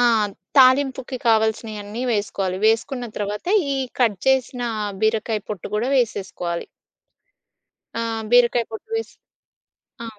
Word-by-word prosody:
ఆ! - - +4 0.5
తాలింపుకి 260 0 +4
కావాల్సియన్నీ 220 0 0
వేసుకోవాలి. 195 -3 -1
వేసుకున్న 245 +3 +1
తర్వాత 205 0 -3 0.3
ఈ - - -1 0.2
కట్ 220 -6 +3
జేసిన 260 -1 +2 0.4
బీరకాయ 220 0 +1
పొట్టు 205 -5 -5
గూడా 220 +4 0
వేసేసుకోవాలి. 190 -7 -2 1.4
ఆహ్, 225 -1 -2
బీరకాయ 240 -1 +5
పొట్టు 220 - -8
వేసి 450 0 -3 0.9
ఆ! - - -5
225 Hz, 105 wpm, -22 LUFS, 210-245 Hz, 1.4 s, బీరకాయ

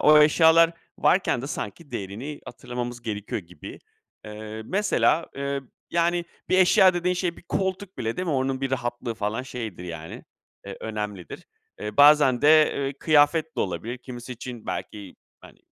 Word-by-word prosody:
o 150 0 +7
eşyalar 165 +2 +5 0.3
varken 180 -9 +2
de - - -4
sanki 145 +4 -6
değerini 120 +7 -6
hatırlamamız 120 -1 -6
gerekiyor 105 -1 -4
gibi. 85 -3 -11 0.5
Eee, 110 +1 -8
mesela, 195 - +2
eee, 140 0 -2 0.3
yani, 170 0 +1 0.2
bir 185 - +3
eşya 185 0 +6
dediğin 180 +1 0
şey, 175 -1 -2
bir - - -15
koltuk 190 +2 -3
bile, 115 0 -2
değil 185 - -3
mi, 160 - 0
onun 130 -1 -1
bir 135 - -2
rahatlığı 120 -2 -3
falan 110 +3 -2
şeydir 115 -8 -7
yani, 80 -2 -8 0.4
eee, - - -7
önemlidir. 105 -5 -6 0.3
Eee, 105 0 -5
bazen 145 -4 +6
de, 155 +1 +6
ııı, 140 0 -1
kıyafet 155 +1 +3
de - - 0
olabilir. 100 +7 -3
Kimisi 125 0 -8
için 120 -1 -9
belki, 100 -3 -6 0.2
hani, - - -16
130 Hz, 155 wpm, -25 LUFS, 110-160 Hz, 0.5 s, o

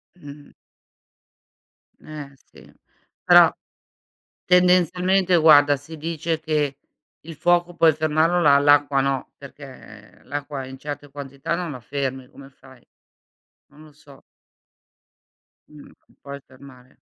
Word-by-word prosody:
M 150 -5 -14
mh-mh. 145 0 -14 1.5
Eh 150 -2 -10
sì. 135 - -20 0.5
Però, - - +6 0.9
tendenzialmente 180 +1 +2
guarda, 145 -3 +5
si 155 +4 -12
dice 160 +1 -4
che 150 -3 -2 0.4
il 165 0 -11
fuoco 175 +2 0
puoi 165 -2 +4
fermarlo, 155 +3 0
l'a 140 -3 +5
l'acqua 145 -1 +3
no, 135 -1 -3
perché 130 -6 -15
l'acqua 145 -1 -6
in 130 0 -11
certe 145 +1 -8
quantità 140 +2 -6
non 175 -2 -5
la 130 - -8
fermi, 130 +1 -5
come 140 0 -15
fai? 130 -2 -20 0.8
Non 150 +1 -18
lo 155 - -18
so. 145 -1 -19 1.5
Mh, 150 -1 -15
non - - -23
puoi 140 0 -9
fermare. 130 -1 -18
145 Hz, 120 wpm, -21 LUFS, 140-160 Hz, 1.5 s, Però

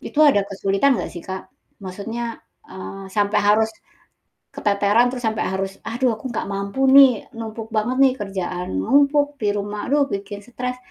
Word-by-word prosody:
itu - - -7
ada 205 - +4
kesulitan 195 +7 +1
nggak - - -4
sih 175 - -7
Kak? 190 +6 -6 0.3
Maksudnya, 225 +5 -5 0.3
eee, 195 +1 -8
sampai 205 0 +2
harus 220 +1 +4 0.9
keteteran, 205 +4 +2
terus 250 -1 -6
sampai 220 0 -1
harus, 195 0 -2 0.2
"Aduh, 240 +1 0
aku 245 +4 -7
nggak 235 - -3
mampu 200 +7 -1
nih, 265 -5 +7
numpuk 225 0 -6
banget 230 +4 0
nih. 265 - +5
Kerjaan 180 - -3
numpuk, 285 - +3
di 210 - +1
rumah, 205 +1 -4
aduh, 285 -1 +3
bikin 200 +1 -5
stres." 250 +1 -4
215 Hz, 160 wpm, -21 LUFS, 200-250 Hz, 0.9 s, nih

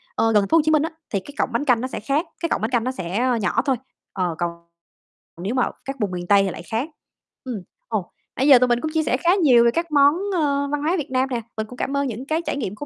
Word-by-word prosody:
ơ, 225 0 +2
gần 205 -1 +5
th - - -10
phố 330 - +5
Hồ - - +5
Chí 310 - +3
Minh 305 -1 +4
á, 325 - -1 0.2
thì 200 - -1
cái 280 +9 -12
cọng - - +1
bánh 290 - 0
canh 245 -4 +3
nó 255 - -2
sẽ - - -5
khác, 290 +5 0
cái 335 - -2
cọng - - 0
bánh 220 - 0
canh 235 -2 +2
nó 255 - -1
sẽ 185 -3 -3 0.2
nhỏ 205 +5 +1
thôi, 270 - +2 0.4
ờ, 180 -4 -1
còn 175 -1 -1 0.9
nếu 210 +7 -2
mà 255 - +3 0.2
các 270 0 -4
vùng 205 -3 -1
miền 175 -1 -5
Tây 200 -1 +5
thì 195 - 0
lại 165 - -8
khác. 230 - -3 0.5
Ừm, 240 -7 -5 0.3
ồ, 210 -6 -3 0.2
nãy 265 - +1
giờ 265 -4 +9
tụi 250 - +3
mình 240 0 +1
cũng 315 - -3
chia 320 -1 +2
sẻ 255 - +1
khá 340 - 0
nhiều 245 -5 +6
về 235 - +5
các 335 +3 -2
món, 285 0 +6 0.2
ơ, 280 -3 +1
văn 295 -1 -1
hóa 330 +5 +1
Việt 290 -5 -4
Nam 260 +1 +1
nè, 240 -2 -2 0.2
mình 215 0 -2
cũng 250 - -11
cảm 280 +1 -2
ơn 280 -1 0
những 240 +2 -5
cái 315 +3 0
trải - - -2
nghiệm 210 -7 -3
của 290 - -7
255 Hz, 300 wpm, -22 LUFS, 215-290 Hz, 0.9 s, giờ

